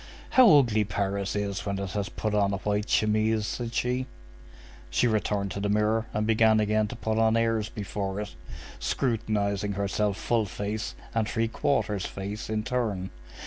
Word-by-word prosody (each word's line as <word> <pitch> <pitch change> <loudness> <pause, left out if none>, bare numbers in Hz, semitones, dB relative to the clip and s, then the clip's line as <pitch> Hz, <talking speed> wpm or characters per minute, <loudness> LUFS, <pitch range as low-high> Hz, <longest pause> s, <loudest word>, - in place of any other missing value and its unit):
"How 255 -3 +7
ugly 115 -6 +3
Paris 100 -1 -2
is 100 -2 -2
when 100 -1 -2
it 100 -1 -4
has 100 -1 -2
put 110 -1 -3
on 100 -1 +2
a - - 0
white 105 +2 -1
chemise!" 110 0 +2
said 120 +1 -3
she. 125 +1 0 0.8
She - - +2
returned 105 -3 0
to 100 - -4
the 100 +1 -1
mirror 105 +2 +1
and 105 0 -1
began 110 0 +4
again 105 0 +2
to 120 - -7
put 110 -1 -1
on 110 0 +4
airs 115 -2 +1
before 100 -2 -4
it, 105 0 -5 0.5
scrutinizing 105 -4 0
herself 100 +1 0
full 115 -2 0
face 105 +3 -4 0.2
and 110 -2 0
three 115 -1 0
quarters 110 -6 0
face 100 +3 -6
in 110 -1 -1
turn. 110 -7 -2
105 Hz, 170 wpm, -27 LUFS, 100-110 Hz, 0.8 s, How